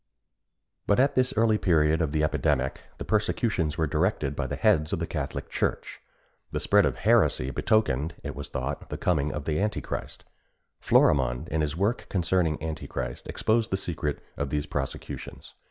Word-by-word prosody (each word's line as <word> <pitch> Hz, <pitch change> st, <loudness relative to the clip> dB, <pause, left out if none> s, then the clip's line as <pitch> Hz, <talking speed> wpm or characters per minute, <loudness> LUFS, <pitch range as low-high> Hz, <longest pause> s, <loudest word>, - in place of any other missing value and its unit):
But 100 Hz, -, +3 dB
at 135 Hz, +2 st, +4 dB
this 130 Hz, 0 st, +2 dB
early 110 Hz, -1 st, +3 dB
period 80 Hz, -2 st, +3 dB
of 80 Hz, -3 st, 0 dB
the 75 Hz, 0 st, +1 dB
epidemic 75 Hz, -4 st, 0 dB, 0.2 s
the -, -, -6 dB
persecutions 105 Hz, -6 st, 0 dB
were 80 Hz, -, +2 dB
directed 75 Hz, -2 st, 0 dB
by -, -, -2 dB
the -, -, -3 dB
heads 75 Hz, 0 st, +2 dB
of 100 Hz, -, 0 dB
the 85 Hz, -, -2 dB
Catholic 75 Hz, -4 st, -4 dB
Church. -, -, -2 dB, 0.5 s
The -, -, -1 dB
spread -, -, +4 dB
of -, -, -2 dB
heresy 65 Hz, +2 st, +3 dB
betokened, 85 Hz, -, +1 dB
it 70 Hz, -1 st, -5 dB
was 70 Hz, -, -7 dB
thought, 65 Hz, -, -4 dB
the -, -, -4 dB
coming 75 Hz, -4 st, +1 dB
of 75 Hz, -1 st, -5 dB
Antichrist. 95 Hz, +8 st, -2 dB, 0.6 s
Florimond, -, -, +3 dB
in 80 Hz, -, 0 dB
his 75 Hz, +1 st, -2 dB
work 100 Hz, +6 st, 0 dB
concerning 85 Hz, -3 st, +1 dB
Antichrist, 75 Hz, -6 st, -5 dB
exposed 115 Hz, +1 st, +1 dB
the 95 Hz, -, 0 dB
secret 80 Hz, -5 st, -3 dB
of 70 Hz, -1 st, -2 dB
these 75 Hz, +1 st, -1 dB
prosecutions. -, -, -6 dB
80 Hz, 165 wpm, -27 LUFS, 75-95 Hz, 0.6 s, at